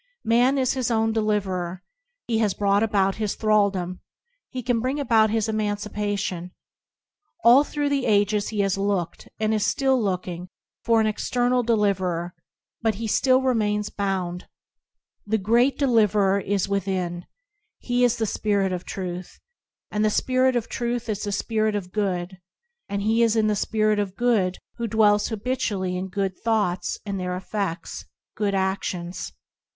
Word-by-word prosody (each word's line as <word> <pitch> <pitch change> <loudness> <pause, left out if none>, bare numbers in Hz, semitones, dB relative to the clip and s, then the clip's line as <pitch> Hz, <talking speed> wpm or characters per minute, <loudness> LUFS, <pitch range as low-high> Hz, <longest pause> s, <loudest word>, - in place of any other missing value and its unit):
Man 245 +4 +3
is 260 -2 +2
his 255 -3 -1
own 225 -1 +1
deliverer. 190 -5 -1 0.4
He 225 -2 0
has 210 -4 +1
brought 200 0 +2
about 200 -3 +1
his 215 -2 -2
thral 215 -2 +3
dom; 185 -1 -4 0.5
he 255 -2 -5
can 240 -1 +1
bring 260 +5 -1
about 225 -6 +3
his 220 0 0
emancipation. 205 -4 -2 0.9
All 245 +5 +7
through 290 -1 -2
the 280 -2 0
ages 205 0 +2
he 210 -2 -1
has 195 -1 0
looked, 195 -4 -2
and 215 0 +1
is 215 -2 +1
still 265 -3 +2
looking, 180 -3 -3 0.3
for 230 -1 +3
an - - +2
external 245 +3 +1
deliverer, 190 -6 0 0.5
but 225 -2 +1
he 225 +3 -5
still 255 +4 +3
remains 210 -5 0
bound. 185 -3 -3 0.8
The 220 +1 +2
Great 235 +7 +2
Deliv 230 -7 +3
erer 200 -1 +3
is 195 -1 0
within; 185 -3 -2 0.5
He 245 0 0
is 245 -2 +3
the 225 - 0
Spirit 200 -2 0
of 180 0 -4
Truth; 180 -1 -6 0.5
and 210 0 0
the 215 - +4
Spirit 255 +3 +2
of 235 -2 -1
Truth 240 -1 -3
is 210 -1 -2
the 205 - -2
Spirit 215 +1 0
of 185 -3 -4
Good; 185 -3 -2 0.5
and 200 0 -2
he 225 +2 +2
is 230 -1 +3
in 220 -1 +3
the 215 0 +2
Spirit 215 0 +1
of 200 -2 -2
Good 210 -7 +1 0.2
who 235 -1 -2
dwells 210 -1 +3
habitually 210 -5 -2
in 185 +1 -3
good 190 -1 -3
thoughts 205 -6 0
and 200 -2 -3
their 180 0 -3
efFe&s, 190 -4 -4 0.3
good 205 -2 0
a&ions. 190 -2 -2
210 Hz, 160 wpm, -24 LUFS, 190-225 Hz, 0.9 s, All